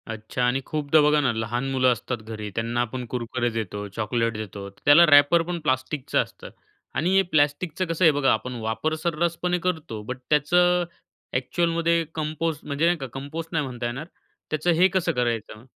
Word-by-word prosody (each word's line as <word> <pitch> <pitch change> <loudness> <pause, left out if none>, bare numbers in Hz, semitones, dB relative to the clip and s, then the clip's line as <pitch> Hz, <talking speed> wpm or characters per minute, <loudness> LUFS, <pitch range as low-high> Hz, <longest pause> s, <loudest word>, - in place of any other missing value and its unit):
अच्छा 110 +2 -4
आणि 125 +2 +1
खूपदा 155 0 +2
बघा 150 0 +4
ना, 135 -4 +2
लहान 120 +4 -2
मुलं 130 -1 +3
असतात 120 +1 -3
घरी, 110 -1 -6
त्यांना 115 +1 -1
आपण 125 +1 -4
कुरकुरे 120 0 -2
देतो, 105 -2 -4
चॉकलेट 115 +1 0
देतो, 100 -2 -7
त्याला 145 +11 +5
रॅपर 145 +3 +6
पण 175 -1 -3
प्लास्टिकचं 130 -1 -1
असतं - - -13 0.5
आणि 180 +4 +1
हे 195 - +6
प्लास्टिकचं 155 +4 +1
कसं 165 +2 +1
आहे 160 - +8
बघा, 145 -2 +2
आपण 125 +3 -3
वापर 115 +8 -1
सर्रासपणे 170 +2 0
करतो 160 -12 -2
बट 125 +4 -5
त्याचं, 175 +4 +3 0.5
एक्चुअलमध्ये 170 +5 +1
कंपोस्ट 155 0 -3
म्हणजे 145 +2 0
नाही 175 +1 +3
का, 135 -3 -6
कंपोस्ट 150 +5 -6
नाही 150 -3 +1
म्हणता 125 -2 -5
येणार. 125 +7 -4 0.4
त्याचं 155 +3 +1
हे 185 - +8
कसं 175 -2 +2
करायचं? 115 -5 -2
140 Hz, 170 wpm, -24 LUFS, 120-165 Hz, 0.5 s, आहे